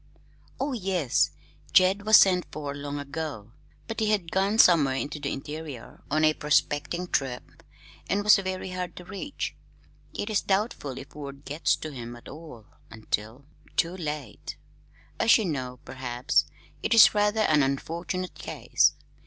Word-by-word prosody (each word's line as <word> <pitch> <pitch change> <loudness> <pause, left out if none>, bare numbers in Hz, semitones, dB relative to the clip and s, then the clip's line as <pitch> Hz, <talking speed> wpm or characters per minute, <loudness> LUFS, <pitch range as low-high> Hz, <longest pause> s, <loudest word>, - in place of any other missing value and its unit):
"Oh, 275 +1 -1
yes. 185 - +1 0.4
Jed 195 +3 +4
was 215 0 +9
sent 180 -2 +4
for 145 -2 -5
long 145 0 -5
ago, 140 -6 -6 0.4
but 225 - -4
he 215 -1 +1
had 195 -6 0
gone 195 +3 +1
somewhere 155 -10 +6
into 145 +3 -3
the - - -3
interior 145 -2 -7
on 155 +2 +1
a 155 0 +5
prospecting 150 +4 0
trip, 130 -6 -3 0.5
and 205 +1 +1
was 210 +1 +7
very 185 -1 -4
hard 180 -1 -4
to 180 - -10
reach. 200 +10 -5 0.6
It 205 - -3
is 210 - +2
doubtful 190 - -1
if 135 - -10
word 140 -1 -9
gets 150 +3 +1
to 155 - -7
him 120 -3 -7
at 120 - -14
all 150 -7 -11 0.2
until 110 +4 -4 0.3
too 170 +2 +1
late. 150 - -6 0.6
As 230 - +6
you 220 - -1
know, 130 -6 -3
perhaps, 130 +1 0 0.4
it - - +1
is 225 - +9
rather 210 +1 +2
an 155 -8 +4
unfortunate 170 +7 -2
case. - - +1
155 Hz, 155 wpm, -27 LUFS, 140-190 Hz, 0.6 s, was